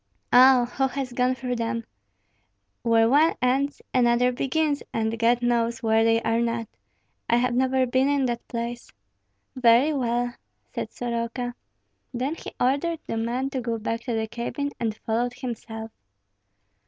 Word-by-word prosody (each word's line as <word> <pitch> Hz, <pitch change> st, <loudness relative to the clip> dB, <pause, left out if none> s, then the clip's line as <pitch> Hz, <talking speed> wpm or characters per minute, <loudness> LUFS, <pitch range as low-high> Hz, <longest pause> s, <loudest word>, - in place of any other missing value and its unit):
"Oh! 255 Hz, 0 st, +7 dB
who 265 Hz, +2 st, 0 dB
has 265 Hz, -1 st, -4 dB
gone 250 Hz, +1 st, +1 dB
through 250 Hz, -1 st, -3 dB
them? 230 Hz, 0 st, -2 dB, 1.0 s
Where 230 Hz, -1 st, +4 dB
one 295 Hz, +6 st, +4 dB
ends 265 Hz, +3 st, 0 dB
another 245 Hz, 0 st, +3 dB
begins, 290 Hz, +3 st, 0 dB
and 225 Hz, 0 st, -1 dB
God 240 Hz, +1 st, +3 dB
knows 235 Hz, 0 st, 0 dB
where 225 Hz, 0 st, +3 dB
they 225 Hz, 0 st, +3 dB
are 225 Hz, +1 st, +1 dB
not; 230 Hz, -1 st, -1 dB, 0.6 s
I 235 Hz, -, +4 dB
have 250 Hz, +1 st, +1 dB
never 260 Hz, +1 st, +2 dB
been 260 Hz, +2 st, +2 dB
in 285 Hz, -2 st, +2 dB
that 240 Hz, -2 st, -3 dB
place." 235 Hz, 0 st, -5 dB, 0.6 s
"Very 255 Hz, +4 st, +4 dB
well!" 245 Hz, -2 st, -1 dB, 0.4 s
said -, -, -4 dB
Soroka. 240 Hz, +1 st, -3 dB, 0.6 s
Then 260 Hz, +5 st, -1 dB
he -, -, -8 dB
ordered 285 Hz, +6 st, +1 dB
the -, -, -4 dB
man 245 Hz, +4 st, -2 dB
to 260 Hz, -, -2 dB
go 230 Hz, -1 st, -2 dB
back 225 Hz, +1 st, -3 dB
to 240 Hz, -3 st, -1 dB
the 220 Hz, 0 st, 0 dB
cabin, 240 Hz, +5 st, -4 dB
and 220 Hz, -2 st, -2 dB
followed 240 Hz, +2 st, 0 dB
himself. 225 Hz, -3 st, -6 dB
245 Hz, 155 wpm, -25 LUFS, 230-260 Hz, 1.0 s, Oh